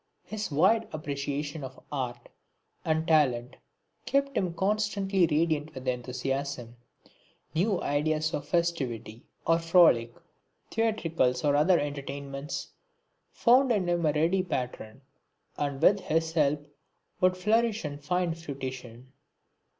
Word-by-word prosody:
His 215 -2 -4
wide 190 +10 +3
appreciation 145 0 -4
of 130 0 -8
art 130 -4 -4 0.6
and 160 0 0
talent 130 -6 +2 0.5
kept 275 0 +1
him 185 -3 0
constantly 195 -1 +1
radiant 155 -1 0
with 130 0 -8
enthusiasm. 130 0 -3 0.8
New 185 +4 +1
ideas 155 +2 0
of 145 0 -3
festivity 135 -11 -1 0.2
or 165 0 +3
frolic, 165 -9 +5 0.6
theatricals 165 - +1
or 145 -1 +3
other 170 +5 +4
entertainments, 140 0 -5 0.6
found 255 +2 +4
in 200 -6 +1
him 175 -1 +1
a 155 - +3
ready 165 +5 +2
patron, 125 -7 -4 0.5
and 140 -2 -2
with 200 +1 +6
his 160 -2 -1
help 150 -2 +1 0.5
would 185 0 +3
flourish 220 +1 +1
and 145 0 -6
find 180 +1 0
fruition. 130 -5 -7
155 Hz, 115 wpm, -28 LUFS, 140-180 Hz, 0.8 s, with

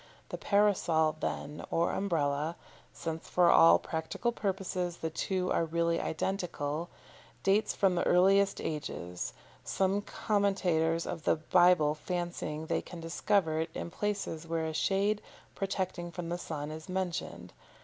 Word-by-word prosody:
The - - -4
Parasol, 175 -7 +3
then, 150 0 -4
or 170 +1 +1
Umbrella 155 -4 0 0.4
since 160 -1 -5
for 180 -1 +5
all 165 - +8
practical 160 +9 -2
purposes 185 -5 -2
the 160 - -3
two 185 +2 -1
are - - +2
really 170 +1 0
identical 170 -3 -2 0.5
dates 200 +3 +2
from 195 -3 +3
the 175 - 0
earliest 195 +2 +4
ages, 90 - -4 0.3
some 195 +1 +1
commentators 185 -7 +1
on 165 - -4
the - - +3
Bible 165 -1 +4
fancying 165 -1 -4
they - - 0
can 175 - -10
discover 165 0 +1
it 160 +1 -1
in 170 - -4
places 195 -5 -3
where 165 -1 -1
a 160 - -3
shade 200 +5 +1 0.3
protecting 185 -3 -3
from 170 -1 -5
the 175 +1 -2
sun 150 -3 -5
is 155 +3 -8
mentioned. 185 -2 -3
175 Hz, 140 wpm, -31 LUFS, 160-195 Hz, 0.5 s, all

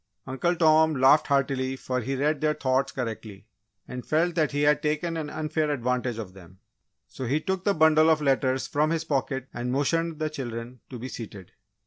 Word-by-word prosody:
Uncle 135 +7 -1
Tom 160 -1 +4
laughed 135 +3 +5
heartily 135 -2 0
for 125 -1 -3
he 135 +4 -3
read 145 +2 0
their 155 0 +1
thoughts 130 0 0
correctly, 110 -5 -6 0.4
and 125 -1 -6
felt 165 +3 +1
that 160 -3 +1
he 145 0 0
had 150 0 +3
taken 155 +3 -1
an 155 -2 -4
unfair 155 0 -2
advantage 125 -3 -1
of 105 -5 -7
them. 95 -1 -15 0.5
So, 130 - -7
he 140 +6 +1
took 190 +3 -3
the 200 -1 +2
bundle 160 0 +5
of 160 -1 +4
letters 135 -2 +1
from 150 +2 +1
his 165 -1 -1
pocket 135 -4 -2
and 120 +1 -3
motioned 165 +4 0
the 155 0 -2
children 120 -3 -6
to 125 - -7
be 120 +2 -6
seated. 105 -7 -9
140 Hz, 190 wpm, -26 LUFS, 125-155 Hz, 0.5 s, laughed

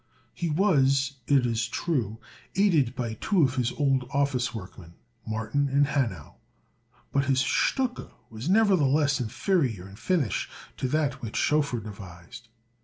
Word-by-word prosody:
He 170 - -3
was, 140 -6 +2
it 135 -3 +4
is 115 -1 0
true, 120 - -2 0.4
aided 160 - +3
by 120 -3 -3
two 175 - +1
of 130 -2 +2
his 125 -1 +1
old 135 -3 0
office 140 -3 0
workmen, 95 -5 -10 0.3
Martin 110 +6 -1
and 140 +2 +3
Hanau; 125 - -2 0.7
but 140 0 +1
his 130 -1 +2
stucke 250 - 0 0.2
was 115 +8 -5
nevertheless 155 -9 +3
inferior 120 - 0
in 100 - -12
finish 150 - 0 0.3
to 130 - -1
that 145 -1 -1
which 115 -3 -6
Schoeffer 145 -5 +1
devised. 100 +1 -11
135 Hz, 135 wpm, -27 LUFS, 115-150 Hz, 0.7 s, it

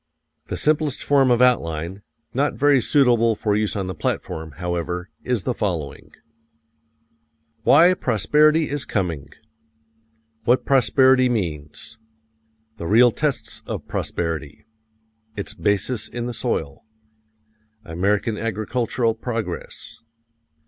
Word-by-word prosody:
The - - -4
simplest 150 -2 0
form 135 -2 +3
of 120 0 +4
outline 85 -6 0 0.3
not 140 +3 0
very 140 -2 +4
suitable 120 -4 +3
for 105 -1 0
use 105 0 0
on 100 -2 -2
the 95 - -4
platform, 80 -1 -4
however 90 +2 -4
is 125 -6 -1
the 125 - -1
following: 85 - -4 1.5
WHY 170 +5 +6
PROSPERITY 150 - +2
IS 145 -2 -3
COMING 85 -9 -3 1.1
What 120 +3 +2
prosperity 130 0 +4
means. 85 -4 -4 0.8
The 85 - -5
real 120 +5 +6
tests 150 +2 -2
of - - -5
prosperity. 75 -3 -4 0.7
Its 100 +1 -4
basis 105 +2 -1
in 120 -1 -5
the 120 - -4
soil. 80 - -3 1.0
American 100 +6 -1
agricultural 115 +2 -1
progress. 115 -5 -6
110 Hz, 105 wpm, -22 LUFS, 90-130 Hz, 1.5 s, WHY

